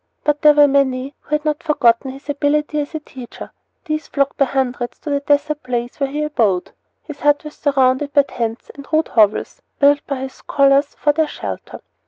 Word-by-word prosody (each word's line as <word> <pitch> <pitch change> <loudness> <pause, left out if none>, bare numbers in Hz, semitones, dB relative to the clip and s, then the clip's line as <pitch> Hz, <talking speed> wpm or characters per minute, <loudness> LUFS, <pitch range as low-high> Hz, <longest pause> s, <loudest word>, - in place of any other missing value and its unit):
But 295 -1 0
there 300 -1 +6
were 290 -1 +7
many 270 -1 0
who 300 - -2
had 300 0 -4
not 300 +1 -1
forgotten 265 -6 +2
his 270 +2 -11
ability 300 +1 0
as 295 +2 -4
a - - -2
teacher. 255 -5 -11 0.3
These 310 0 -3
flocked 280 -1 0
by 275 - +4
hundreds 250 -2 -2
to 295 - -5
the 285 - +1
desert 290 +1 0
place 245 0 -4
where 275 -1 0
he 295 +2 -2
abode. 220 -12 0 0.3
His 300 -2 -9
hut 290 +1 +2
was 300 0 -9
surrounded 270 0 +1
by 285 0 +5
tents 230 -3 -5
and 280 -1 -12
rude 315 0 +1
hovels, 220 - +2 0.2
built 285 0 +4
by 275 -2 -3
his 265 0 -6
scholars 275 +1 +2
for 295 - +1
their 315 +1 +1
shelter. - - -7
285 Hz, 200 wpm, -19 LUFS, 260-300 Hz, 0.3 s, were